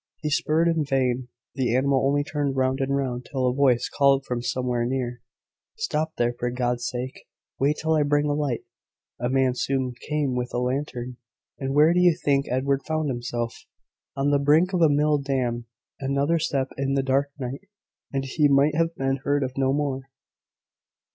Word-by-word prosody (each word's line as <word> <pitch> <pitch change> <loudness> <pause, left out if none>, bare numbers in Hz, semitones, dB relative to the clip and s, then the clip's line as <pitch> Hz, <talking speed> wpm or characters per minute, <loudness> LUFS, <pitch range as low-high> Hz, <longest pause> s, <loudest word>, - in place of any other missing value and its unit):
He 150 - -1
spurred 155 +3 +2
in 165 -2 +2
vain; 130 -3 0 0.3
the 125 -3 0
animal 135 +1 +2
only 145 +1 +2
turned 145 -2 -2
round 130 +1 +1
and 135 0 0
round, 125 -3 -2
till 130 -2 -1
a 125 - +1
voice 130 -3 +3
called 140 -1 +3
from 125 -1 -2
somewhere 125 -1 -1
near, 125 -1 -2 0.6
`Stop 160 - -1
there, 120 0 +1
for 120 0 -2
God's 120 -1 -1
sake! 125 +1 -6 0.3
Wait 145 +3 +2
till 160 0 +1
I 155 - +3
bring 145 0 +2
a 145 - +1
light.' 145 -5 -1 0.6
A 120 +1 -1
man 130 -1 +2
soon 130 0 -1 0.2
came 150 -3 0
with 125 0 -3
a - - +1
lantern, 125 -1 -3 0.4
and 135 0 -2
where 155 +3 +6
do 180 - +2
you 175 -2 +4
think 140 -4 +1
Edward 135 +2 +1
found 155 -2 -1
himself? 120 -1 -4 0.5
On 140 +1 +1
the 145 - +3
brink 155 +7 +3
of 180 - +1
a 160 - +6
mill 150 +1 +3
dam! 125 -4 -2 0.3
Another 140 +4 +1
step 135 -4 -1
in 135 0 0
the 135 - +1
dark 135 +2 +1
night, 135 +8 -6 0.4
and 135 -1 -2
he 145 +3 +2
might 140 +1 +4
have 165 +1 0
been 135 0 0
heard 145 +1 0
of 130 -1 -4
no 135 -1 +1
more!" 135 -2 -2
135 Hz, 185 wpm, -25 LUFS, 125-145 Hz, 0.6 s, where